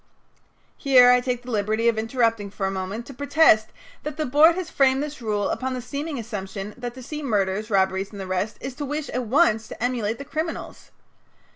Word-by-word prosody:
Here 250 -3 +6
I 250 0 +4
take 245 -1 -2
the 250 - -7
liberty 215 +2 0
of 230 - +3
interrupting 225 -2 0
for 195 0 -4
a 190 - 0
moment 195 +5 -4
to 275 - -10
protest 280 -5 +4 0.3
that 300 -1 -6
the 310 - -1
board 300 +5 +5
has 370 -2 -3
framed 270 0 +3
this 300 -2 -7
rule 210 -3 -1
upon 260 0 -2
the - - -3
seeming 285 +4 -5
assumption 205 -3 -6
that 245 -1 -6
to 260 - -9
see 300 +4 -6
murders, 210 -4 -1
robberies, 190 -1 +1
and 205 - -10
the 195 - -5
rest 190 +3 -2
is 265 - -5
to 290 - -3
wish 295 +1 -4
at 250 -1 -2
once 225 -5 +3
to - - -7
emulate 235 -3 -1
the 280 - -8
criminals. 315 +4 -5
240 Hz, 210 wpm, -24 LUFS, 210-280 Hz, 0.3 s, Here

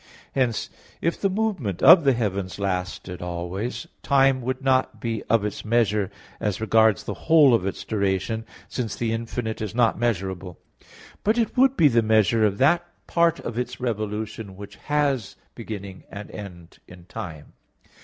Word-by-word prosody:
Hence, 125 -4 0 0.3
if 170 - -1
the 195 - +2
movement 190 - -2
of 170 -2 +9
the 135 - +5
heavens 100 -5 -2
lasted 90 -2 -3
always, 90 - -4 0.2
time 135 -2 +3
would 130 +2 -3
not 130 -3 +1
be 115 -1 -3
of 110 -2 +3
its 105 - -4
measure 105 -3 +1 0.3
as 105 -3 -1
regards 110 -1 +3
the - - -4 0.2
whole 155 -5 +7
of 95 -5 +2
its 95 - -4
duration, 100 +1 -1 0.2
since 115 -5 -3
the 115 -1 -1
infinite 115 -1 -4
is 110 0 -4
not 120 -2 +2
measurable; 95 -6 -2 0.7
but 215 +3 +2
it 230 -2 0
would 265 +1 +4
be 155 - +6
the 120 -4 +3
measure 110 0 +3
of 100 -2 +2
that 170 +8 +4 0.2
part 170 -1 +2
of 120 0 -4
its 125 0 -4
revolution 110 -3 -4
which 100 0 -10
has 145 -6 -1 0.2
beginning 100 -3 -8
and 100 +2 -8
end 90 -5 -10
in 90 -1 -14
time. 80 -4 -8
110 Hz, 160 wpm, -24 LUFS, 100-130 Hz, 0.7 s, of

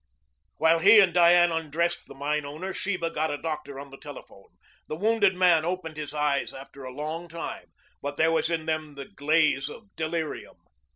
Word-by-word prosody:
While 165 +1 +4
he 205 +5 +8
and 185 -4 +5
Diane 175 0 +6
undressed 165 +2 -1
the - - -12
mine 150 +2 -1
owner 155 +7 -6
Sheba 180 -4 -2
got 155 0 -1
a 145 - -2
doctor 150 -3 -5
on 140 0 -10
the 135 - -12
telephone. 135 -8 -12 0.4
The 155 - -4
wounded 205 +1 +2
man 175 -3 +4
opened 170 -2 -3
his 150 -1 -5
eyes 150 -2 -1
after 135 0 -11
a 130 - -7
long 155 +5 -5
time, 165 0 -7 0.3
but 145 0 -5
there 160 +1 +3
was 165 0 +1
in 165 -2 -2
them 155 -2 -3
the 140 - -7
glaze 150 -6 +1
of 200 +5 -13
delirium. 160 0 -4
160 Hz, 185 wpm, -26 LUFS, 145-175 Hz, 0.4 s, he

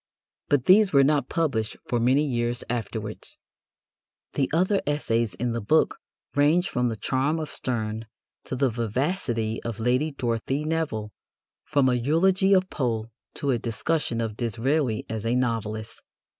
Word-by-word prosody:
But 145 -4 +2
these 200 +1 +6
were 140 -1 +6
not 145 +1 +2
published 130 -10 -1
for 120 - 0
many 130 +5 +3
years 120 -2 -1
afterwards. 110 -2 -4 1.0
The 135 - 0
other 185 +5 +2
essays 115 -7 0
in 120 0 -1
the 115 - -2
book 155 +10 +2 0.4
range 155 +6 +4
from 125 0 0
the 115 - -3
charm 135 +8 0
of 155 -2 -4
Sterne 110 -2 -3 0.4
to - - -3
the 130 -1 +2
vivacity 115 - -1
of 115 -2 -5
Lady 125 +6 +2
Dorothy 130 +1 -2
Nevill, 155 -10 -2 0.5
from 140 -3 +2
a 130 - +3
eulogy 180 +10 +3
of 190 -1 +4
Poe 115 -4 -2 0.2
to 140 - 0
a 120 - +1
discussion 115 +1 -1
of 110 -2 -3
Disraeli 120 +2 0
as 110 -2 -4
a 115 +2 +1
novelist. 110 -3 -2
125 Hz, 150 wpm, -26 LUFS, 115-150 Hz, 1.0 s, these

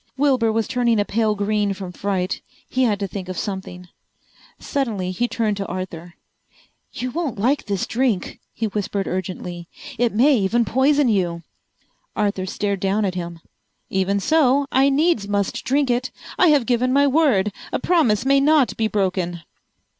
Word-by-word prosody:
Wilbur 260 -5 +2
was 225 0 0
turning 240 -3 +1
a 205 - +1
pale 215 0 +1
green 205 -1 0
from 190 -2 -7
fright. 185 0 -2 0.3
He 260 - -1
had 210 -4 +1
to 200 - -1
think 185 0 -7
of 185 - -5
something. 190 -2 -5 0.7
Suddenly 220 -10 -2
he 240 +7 -1
turned 220 -4 -1
to 195 -2 -4
Arthur. 175 -2 -6 0.8
"You 250 +1 -4
won't 305 -7 -3
like 250 +5 0
this 200 -3 -1
drink," 235 -7 -1
he 225 - -3
whispered 205 -1 -2
urgently. 180 -2 -5 0.3
"It 240 -1 +2
may 265 +7 +4
even 230 +4 +1
poison 275 +6 +3
you!" 175 -6 0 0.7
Arthur 200 -3 -1
stared 200 0 -2
down 200 +3 +1
at 190 - -1
him. 170 -2 -6 0.5
"Even 195 +1 +1
so 285 +2 +3
I 270 +2 +4
needs 280 -7 +2
must 200 -1 -1
drink 275 0 +1
it. 245 +2 0 0.3
I 365 - +4
have 290 -6 +4
given 250 +2 +1
my 280 +2 +4
word. 260 -9 +2 0.2
A - - 0
promise 260 - +2
may 275 +1 +4
not 285 -3 +3
be 225 - +1
broken." 185 -4 -1
210 Hz, 165 wpm, -21 LUFS, 190-255 Hz, 0.8 s, may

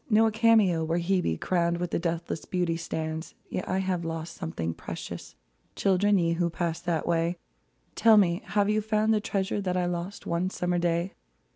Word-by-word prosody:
Nor 220 0 +5
a - - -6
cameo 215 -7 +4
where 165 +2 0
Hebe, 175 - 0
Crowned 170 -1 +1
with 175 0 -3
deathless 170 -1 -2
beauty, 175 -2 0
stands. 160 -1 -4 0.2
Yet - - -2
have 185 -2 0
I - - -4
lost 165 0 -5
something 80 +1 -3
precious; - - -7 0.4
Children, 200 +1 +3
ye 170 -2 +2
who 170 0 0
passed 170 0 -3
that 165 -3 0
way 170 +1 +1 0.3
— - - -42
Tell 225 -2 +7
me, 175 -3 +3
have 205 -1 +1
you 215 +1 +2
found 215 +1 +2
the 215 - +1
treasure 195 0 -1
That 185 -2 -1
I 180 - +1
lost 175 +2 -4
one 170 +2 0
summer 180 -2 -1
day 170 +2 0
175 Hz, 185 wpm, -27 LUFS, 170-195 Hz, 0.4 s, Tell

